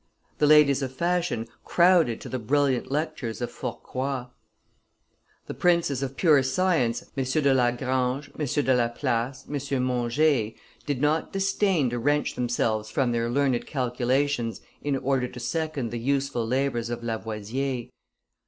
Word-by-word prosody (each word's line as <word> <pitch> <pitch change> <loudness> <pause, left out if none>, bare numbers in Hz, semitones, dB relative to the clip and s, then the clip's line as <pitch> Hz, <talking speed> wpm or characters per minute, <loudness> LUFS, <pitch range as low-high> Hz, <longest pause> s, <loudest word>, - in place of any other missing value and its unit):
The 150 - +4
ladies 145 -2 +6
of 130 -2 -2
fashion 170 -8 0 0.2
crowded 170 -9 +4
to - - -8
the 130 - -3
brilliant 135 +2 +1
lectures 150 -6 -2
of 120 - -3
Fourcroy. 130 -1 -4 1.2
The - - -6
princes 170 -7 +2
of 135 0 -4
pure 155 -6 +5
science, 130 -4 +1
M. 135 - 0
de 140 +1 +2
Lagrange, 130 +2 0
M. 155 - -4
de 135 0 +2
Laplace, 120 +2 -1
M. 140 -2 -2
Monge, 125 -1 +1 0.3
did 140 -3 -1
not 150 +2 +1
disdain 195 - +1
to 120 - -2
wrench 145 +4 +1
themselves 115 -3 -1
from 130 -5 +1
their 115 0 0
learned 130 -1 +1
calculations 125 -1 0 0.2
in 145 -2 0
order 135 -1 0
to 125 - -10
second 140 -1 -2
the 120 - -3
useful 135 -2 0
labors 125 -2 0
of 120 0 -4
Lavoisier. 115 +3 -3
130 Hz, 140 wpm, -26 LUFS, 120-145 Hz, 1.2 s, ladies